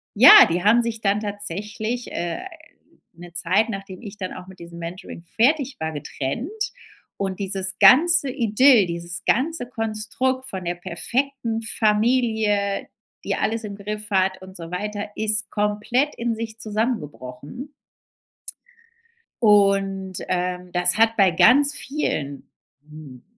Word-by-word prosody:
ja 245 +7 +10
die 175 +1 -1
haben 230 +3 +5
sich 230 -1 -4
dann 200 0 +1
tatsächlich, 210 +3 -5
äh, 170 0 -3 0.7
'ne 175 0 -13
Zeit, 185 +6 +1
nachdem 195 -3 -7
ich 210 -3 -10
dann 185 -2 -5
auch 185 0 -10
mit 190 0 -14
diesem 170 0 -11
Mentoring 170 0 -8
fertig 270 - +1
war, 160 0 -3
getrennt. 145 - -5 0.7
Und 190 -1 -3
dieses 190 -1 -1
ganze 280 - +6
Idyll, 235 -2 +4
dieses 170 +1 -6
ganze 270 +1 0
Konstrukt 230 +3 -2
von 185 -2 -6
der 175 +1 -2
perfekten 235 +6 -2
Familie, 215 -2 +1 0.4
die - - -1
alles 225 +1 -2
im 205 -2 -6
Griff 210 +1 -5
hat 190 0 +1
und 190 0 -12
so 165 0 -9
weiter, 205 +3 -4
ist 215 0 +1
komplett 210 +7 0
in 235 -1 -2
sich 225 0 -7
zusammengebrochen. 210 - -5 1.7
Und, 195 -2 +2
ähm, 180 0 -3
das 180 +3 +3
hat 225 0 +3
bei 190 -3 +5
ganz 265 - +5
vielen, 150 - -2 0.5
hm 150 -5 -12
205 Hz, 130 wpm, -22 LUFS, 180-230 Hz, 1.7 s, ja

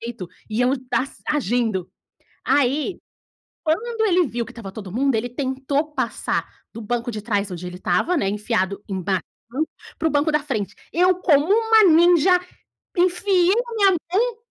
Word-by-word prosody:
peito 230 -6 -6 0.2
e 215 +2 -2
eu 250 +1 +3 0.2
dass 275 +1 -1
agindo. 235 - 0 0.6
Aí, 285 +6 +1 0.7
quando 445 +9 -1
ele 360 -4 +3
viu 235 -1 -3
que - - -11
estava 215 -5 -8
todo 195 -3 -8
mundo, 270 +2 +1
ele 230 +3 -1
tentou 270 +4 -2
passar - - -2 0.3
do 230 - -8
banco 240 +2 -2
de 215 -2 -5
trás 205 -2 -1
onde 180 0 -6
ele 180 0 -7
estava, 185 - +1
né, 195 -11 +1
enfiado 205 -2 -1
embaixo, 190 -2 -1 0.8
para 320 - +1
o - - -4
banco 295 +2 +2
da 300 - +3
frente. 215 -9 -3 0.2
Eu, 365 +2 +4
como 295 -6 +3
uma 445 -1 +5
ninja, 345 0 +5 0.7
enfiei 360 +1 +3
na 470 - -6
minha 395 -4 +4 0.2
mão 470 +4 +1
270 Hz, 160 wpm, -22 LUFS, 215-350 Hz, 0.8 s, uma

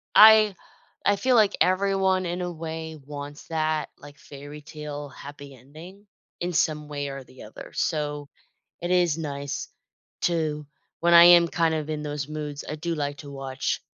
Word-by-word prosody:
I 215 -2 +8 0.5
I 205 - +3
feel 255 +4 +2
like 210 -3 +4
everyone, 190 0 +2
in 175 +1 -3
a 180 0 -3
way, 160 -1 -6
wants 145 0 -8
that, 155 -2 -1
like, 145 0 -13
fairytale 145 0 -9
happy 140 0 -11
ending, 165 - -14 0.3
in 175 +1 -2
some 150 -1 0
way 145 -1 -4
or 135 -1 -7
the 130 - -14
other, - - -11
so, 150 -2 -2 0.5
it 175 - -3
is 175 -4 +3
nice 140 -3 -4 0.5
to 155 -3 0 0.4
when 170 0 +4
I 170 0 +10
am, 175 -1 +8
kind 165 -1 +1
of, 155 -1 -4
in 150 -1 -3
those 145 -1 -4
moods, 150 -2 -5
I 150 - -3
do 165 +2 -3
like 145 -1 -3
to 145 - -10
watch 135 -1 -3
155 Hz, 165 wpm, -25 LUFS, 145-175 Hz, 0.5 s, I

